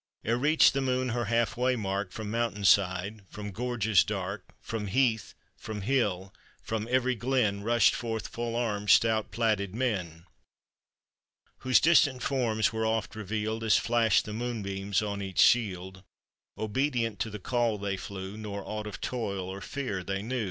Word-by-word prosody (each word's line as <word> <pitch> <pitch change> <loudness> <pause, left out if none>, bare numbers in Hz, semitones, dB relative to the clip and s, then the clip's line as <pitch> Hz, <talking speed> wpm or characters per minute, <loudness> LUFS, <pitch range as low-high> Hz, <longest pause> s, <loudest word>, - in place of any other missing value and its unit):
Ere 115 - +2
reached 150 +6 +4
the 135 - 0
moon 130 -1 0
her 120 0 -1
half 115 -2 +1
way 125 +1 +1
mark, 100 -3 -2
Prom 105 +1 -6
mountain 115 -3 -1
side, 95 +2 +3
from 105 -1 -7
gorges 110 -2 +2
dark, - - -5
Prom 110 -2 -3
heath, 110 -1 +1 0.2
from 105 -2 -6
hill, 100 -5 0 0.3
from 110 0 -3
every 130 0 +2
glen, 120 -4 0
Rushed 115 +2 +4
forth 115 -2 -3
full 115 0 -4
armed, 105 -4 -1
stout, 110 +2 +4
plaided 105 -2 0
men, 90 -10 -2 1.3
Whose 130 -1 +4
distant 145 -6 +4
forms 115 -5 +1
were 110 0 -1
oft 110 -1 -1
revealed 110 +1 -3
As 110 - +4
flashed 115 -1 +2
the 105 - -6
moonbeams 100 -4 -2
on 100 -1 -3
each 95 -2 -6
shield; 95 -5 +3 0.6
Obedient 115 -1 -1
to 105 - -1
the 105 - -6
call 115 +1 0
they 100 -1 -2
flew, 95 +1 -7
Nor 100 -2 -5
aught 105 0 -5
of 105 - -8
toil 100 -7 -3
or 95 +1 -6
fear 115 -10 -4
they 95 +2 -3
knew. 125 +3 -2
110 Hz, 160 wpm, -29 LUFS, 100-120 Hz, 1.3 s, reached